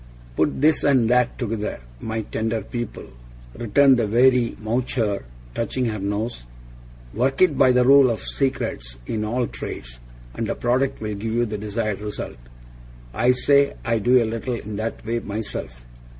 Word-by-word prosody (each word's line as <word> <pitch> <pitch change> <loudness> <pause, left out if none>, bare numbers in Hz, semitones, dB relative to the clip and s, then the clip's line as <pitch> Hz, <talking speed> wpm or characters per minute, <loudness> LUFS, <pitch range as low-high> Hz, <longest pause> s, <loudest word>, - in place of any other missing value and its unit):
'Put 80 - 0
this 155 +1 +4
and 130 -5 +4
that 125 -1 +2
together, 110 -3 -3 0.2
my 110 - -3
tender 110 0 -2
pupil,' 120 - -6 0.4
returned 130 +4 +4
the 115 - +1
wary 125 +2 +3
Mowcher, 110 -2 -1 0.3
touching 125 +2 -1
her 110 -2 -2
nose, 100 - -3 0.7
'work 135 +4 0
it 160 -6 +3
by 130 -1 +5
the 125 0 +3
rule 135 0 +7
of 115 - -1
Secrets - - -2
in 105 - -2
all 120 +3 0
trades, - - -7 0.3
and - - -3
the - - -2
product 130 +3 0
will 105 -1 -3
give 110 +2 -4
you 120 +1 +2
the 105 -2 -4
desired 105 -1 -2
result. 105 - -5 0.8
I 120 - +3
say 140 +2 +3
I 115 -1 +1
do 125 +3 +4
a - - -1
little 115 +3 -3
in 110 -2 -6
that 110 +1 -4
way 115 +1 -1
myself. 100 - -6
115 Hz, 165 wpm, -23 LUFS, 105-125 Hz, 0.8 s, rule